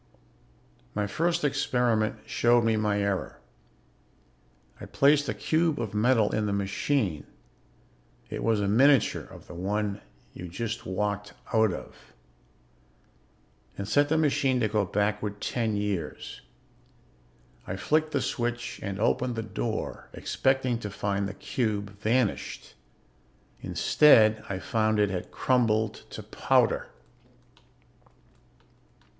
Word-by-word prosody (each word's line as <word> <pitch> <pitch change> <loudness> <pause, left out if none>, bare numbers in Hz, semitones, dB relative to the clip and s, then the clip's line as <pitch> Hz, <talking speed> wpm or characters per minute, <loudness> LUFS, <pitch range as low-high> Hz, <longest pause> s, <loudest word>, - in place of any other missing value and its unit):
"My 105 0 0
first 170 - 0
experiment 125 -7 +1
showed 120 0 +3
me 115 -1 +2
my 105 -1 +1
error. 100 -1 -2 1.4
I - - -8
placed 145 +1 +3
a - - 0
cube 160 -1 +1
of 110 -4 -4
metal 110 0 +3
in 105 0 0
the 100 - -1
machine 100 - -1 1.0
it - - -5
was 115 -2 +2
a 100 - 0
miniature 130 +5 +4
of - - -13
the - - -11
one 100 +3 -2 0.3
you 90 - -8
just 115 +6 -5
walked 105 +2 -2 0.2
out 110 -2 +4
of - - -10 1.6
and 100 - -4
set 145 +5 +3
the 160 - +2
machine 145 -4 +2
to 110 - +3
go 105 -1 +1
backward 105 +1 -1
ten 115 -3 -1
years. 100 -6 -4 1.3
I 95 - -3
flicked 155 +11 +1
the 140 - 0
switch 120 0 -3
and 100 -1 -4
opened 125 +2 +1
the 115 - -3
door, - - -4
expecting 130 -3 0
to 105 - -5
find 100 0 -2
the 100 - -8
cube 105 -3 -2
vanished. 115 0 -1 0.9
Instead 110 -7 +4
I 95 - -2
found 110 +2 0
it 105 -2 +2
had 90 -2 -4
crumbled 110 -4 +1
to - - -8
powder. - - +1
110 Hz, 120 wpm, -27 LUFS, 100-125 Hz, 1.6 s, miniature